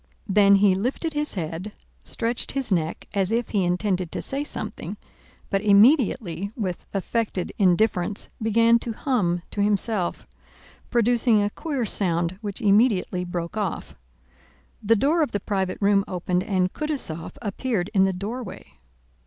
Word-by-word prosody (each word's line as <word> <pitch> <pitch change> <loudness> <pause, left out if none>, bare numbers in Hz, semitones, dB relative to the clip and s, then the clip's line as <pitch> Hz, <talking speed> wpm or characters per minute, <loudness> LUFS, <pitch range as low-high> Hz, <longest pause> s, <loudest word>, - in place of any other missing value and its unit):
Then 200 0 +5
he 195 -1 +5
lifted 255 - -2
his 295 -3 -1
head, 175 +4 -4 0.3
stretched 235 +1 -2
his 270 -5 -2
neck 165 -3 -1
as 195 -1 +1
if 235 +1 0
he 200 -3 +1
intended 180 0 0
to - - -2
say 275 +2 -2
something, 295 - -6 0.5
but 195 -1 +1
immediately, 205 - +3
with 190 -7 -4
affected 200 -1 -2
indifference, 195 0 +2
began 230 +2 +4
to 230 -1 -4
hum 190 -10 0
to 205 - -2
himself, 205 -2 0 0.6
producing 235 -2 +3
a 205 - -1
queer 280 -5 -3
sound 175 -2 -1
which 205 -3 -5
immediately 200 -3 +3
broke 175 0 -4
off. 205 -5 -3 0.9
The 225 +2 +3
door 290 +10 +2
of 295 - 0
the 205 - 0
private 190 -3 -2
room 200 -1 +3
opened 180 0 -1
and 185 -2 0
Kutúzov 275 - -4
appeared 205 -3 -2
in 190 -2 +4
the 190 - +1
doorway. 210 - -7
205 Hz, 145 wpm, -24 LUFS, 185-230 Hz, 0.9 s, Then